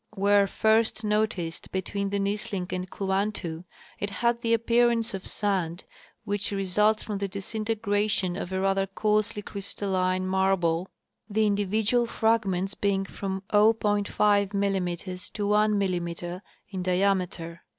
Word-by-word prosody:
Where 200 0 +4
first 220 +2 +2
noticed 210 -6 -1
between 200 +1 -2
the 200 - -1
Nisling 200 -2 -2
and 185 0 -3
Kluantu 190 -4 -2 0.3
it 205 - -2
had 235 +4 0
the 230 -2 0
appearance 235 0 +2
of 190 -1 -5
sand 185 -4 -1 0.4
which 205 -2 -2
results 205 +2 +2
from 205 -2 -4
the 200 - -1
disintegration 205 -1 -1
of 190 -2 -5
a 190 - -1
rather 195 0 +1
coarsely 210 +1 0
crystalline 185 -2 -2
marble, 185 -2 +1 0.4
the 215 +1 +2
indi 205 -1 +1
vidual 220 +4 +2
fragments 200 -5 +1
being 195 -1 0
from 195 0 -5
0.5 210 -1 +4
mm 195 -3 0
to 205 -1 -2
1 210 +1 +3
mm 175 -1 -2 0.3
in 190 -2 -3
diameter. 180 -2 0
200 Hz, 130 wpm, -27 LUFS, 185-210 Hz, 0.4 s, Where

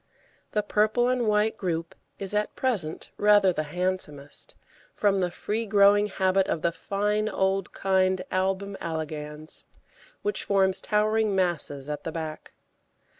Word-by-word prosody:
The 210 - +1
purple 215 +4 +2
and 250 -2 +1
white 210 +1 +2
group 170 -3 -3 0.2
is 195 0 -4
at 210 0 -1
present 205 -12 -2
rather 205 -3 +5
the 155 - -1
handsomest, 175 -5 -3 0.4
from 200 -2 +2
the 180 -1 +1
free 220 +5 -3
growing 205 0 +5
habit 190 -1 +1
of 160 - -2
the 170 - +2
fine 210 +4 -1
old 190 -1 0
kind 190 -1 +1
Album 195 +1 -1
elegans, 155 -1 -5 0.6
which 415 - -1
forms 190 -1 +3
towering 215 0 +1
masses 160 -7 -1
at 150 0 -4
the 165 - -4
back. 160 -1 -6
195 Hz, 135 wpm, -26 LUFS, 170-210 Hz, 0.6 s, rather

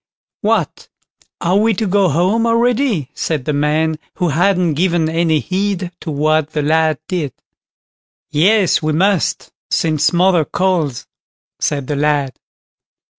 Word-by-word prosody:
"What! - - -1 0.5
are 180 +3 +2
we 220 +1 +2
to 220 - -1
go 195 -1 +2
home 185 +10 +1
already?" 230 - +1
said 150 -6 -3
the 150 - -1
man, 155 +2 0 0.2
who 180 - 0
hadn't 175 +2 +2
given 170 0 +1
any 160 -1 +1
heed 190 +1 -2
to - - -7
what 155 +1 0
the 150 - -1
lad 160 0 +2
did. 160 -8 -3 1.0
"Yes, 190 +4 +3
we 155 0 -1
must, 190 +2 0 0.2
since 155 -1 +1
mother 175 -1 +3
calls", 165 -6 -1 0.5
said 140 -2 -1
the 145 - -3
lad. 145 -2 0
165 Hz, 130 wpm, -17 LUFS, 150-190 Hz, 1.0 s, Yes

